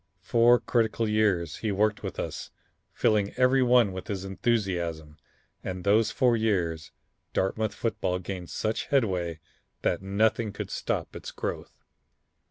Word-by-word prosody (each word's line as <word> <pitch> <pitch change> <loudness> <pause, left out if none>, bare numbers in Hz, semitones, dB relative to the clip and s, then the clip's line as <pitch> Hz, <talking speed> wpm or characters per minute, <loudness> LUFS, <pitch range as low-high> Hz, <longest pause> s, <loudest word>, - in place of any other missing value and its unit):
Four 120 +1 +5
critical 115 -1 +1
years 100 -7 +1
he 110 - -2
worked 105 +2 +1
with - - -5
us - - -4 0.4
filling 105 -2 +1
every 130 +1 +4
one 125 -4 +4
with 95 0 -7
his 100 -2 -4
enthusiasm 90 -7 -2 0.5
and 90 -1 -5
those 105 +2 +4
four 125 -2 +3
years 90 -8 -1 0.4
Dartmouth 105 +2 0
football 105 -5 -1
gained 90 -1 -6
such 110 0 -2
headway 90 - 0 0.4
that - - +1
nothing 105 +2 +1
could - - -6
stop - - -3
its - - -7
growth." - - -6
105 Hz, 135 wpm, -27 LUFS, 90-115 Hz, 0.5 s, Four